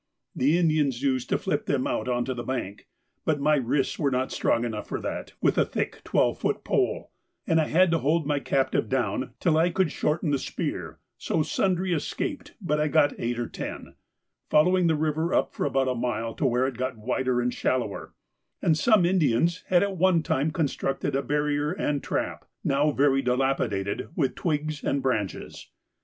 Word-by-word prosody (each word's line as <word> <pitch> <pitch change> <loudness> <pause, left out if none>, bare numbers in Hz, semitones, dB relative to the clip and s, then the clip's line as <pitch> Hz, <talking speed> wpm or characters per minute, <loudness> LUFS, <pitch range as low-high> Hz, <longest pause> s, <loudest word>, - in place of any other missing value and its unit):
The 145 +6 +3
Indians 150 -7 +1
used 130 -3 0
to - - +2
flip - - -2
them - - +1
out 110 - -1
on 120 -1 0
to 130 - -2
the 120 - -5
bank, 115 -5 -4 0.4
but 155 -2 +1
my 150 +1 +3
wrists 135 +1 0
were 145 - +2
not 130 0 -1
strong 120 +1 +1
enough 110 -3 -4
for - - -3
that - - -5
with - - +2
a - - +6
thick - - -3
twelve - - +1
foot - - -1
pole, - - 0 0.3
and 160 -1 +3
I 155 - -1
had 180 +2 +4
to 165 - +2
hold 155 +2 +1
my 145 -1 0
captive 135 -5 0
down 130 0 -1
till 160 -2 +2
I 170 +2 +3
could 180 -2 +1
shorten 150 +1 0
the 140 - +1
spear, - - -4 0.2
so 160 - 0
sundry 185 +2 0
escaped, 155 - -3
but 150 +1 -1
I 150 - +2
got 145 -1 +3
eight 120 0 -2
or 120 - -1
ten, - - -7 0.6
following 180 +3 +4
the 160 - +3
river 155 +2 0
up - - +1
for - - -1
about 135 -1 +1
a 130 - +1
mile 115 -2 -2
to 140 - 0
where 125 +1 +2
it 130 -3 -3
got 130 -1 -3
wider 125 +2 0
and 125 0 0
shallower, 120 -6 -2 0.4
and 160 - +2
some 200 +3 +4
Indians 170 -1 +2
had 180 0 +4
at 200 -2 -2
one 175 -2 +3
time 145 +1 0
constructed 145 -3 -1
a 135 - +1
barrier 150 +1 0
and 145 -6 -1
trap, - - -3 0.2
now 140 +2 +2
very 140 -1 +3
dilapidated, 125 -6 -1
with 140 -6 +1
twigs 155 -3 -2
and 140 -1 0
branches. 110 -7 -3
145 Hz, 190 wpm, -26 LUFS, 130-160 Hz, 0.6 s, a